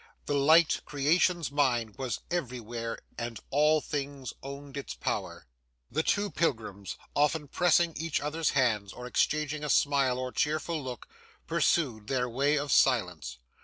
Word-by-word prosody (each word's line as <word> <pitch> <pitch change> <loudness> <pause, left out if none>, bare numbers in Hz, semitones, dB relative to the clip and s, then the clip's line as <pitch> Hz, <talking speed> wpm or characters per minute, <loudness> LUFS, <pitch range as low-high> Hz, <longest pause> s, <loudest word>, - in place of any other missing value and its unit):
The 145 - -1
light, 155 +4 +5
creation's 160 +3 +1
mind, 120 -7 +1
was 130 -3 -3
everywhere, 120 -7 -3 0.2
and 120 -1 -4
all 150 +2 +4
things 140 -4 -4
owned 140 0 -8
its 140 - -5
power. - - -3 0.5
The 155 - +1
two 205 +4 0
pilgrims, 110 - -2 0.2
often 150 +1 +2
pressing 170 +2 +3
each 160 -1 -1
other's 155 +2 -1
hands, 110 -7 +1
or 125 - -8
exchanging 150 +3 0
a 150 - -3
smile 140 -3 +3
or 130 0 -3
cheerful 155 +2 -1
look, 125 -2 -7 0.4
pursued 120 -11 +1
their 125 -1 0
way 140 +5 +1
in 145 0 -2
silence. 90 - +2
140 Hz, 140 wpm, -29 LUFS, 125-150 Hz, 0.5 s, light